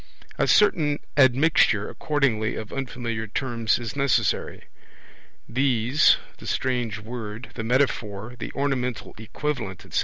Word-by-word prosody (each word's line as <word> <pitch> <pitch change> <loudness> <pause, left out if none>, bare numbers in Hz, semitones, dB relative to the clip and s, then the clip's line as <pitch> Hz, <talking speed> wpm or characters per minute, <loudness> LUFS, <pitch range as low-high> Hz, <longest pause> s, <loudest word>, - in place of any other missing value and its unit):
A - - +2
certain 155 -8 +4 0.2
admixture, 130 -5 +4
accordingly, 125 -8 0
of 110 - -7
unfamiliar 120 -4 -4
terms 115 0 0
is 120 +1 -6
necessary. 140 -3 0 0.8
These, 125 +2 +3 0.2
the - - -10
strange 120 -5 -1
word, 110 +1 -7
the 115 - -5
metaphor, 120 -3 -1
the - - -5
ornamental 125 -4 -2
equivalent, 110 -4 -4
etc.. - - -1
125 Hz, 115 wpm, -25 LUFS, 110-140 Hz, 0.8 s, certain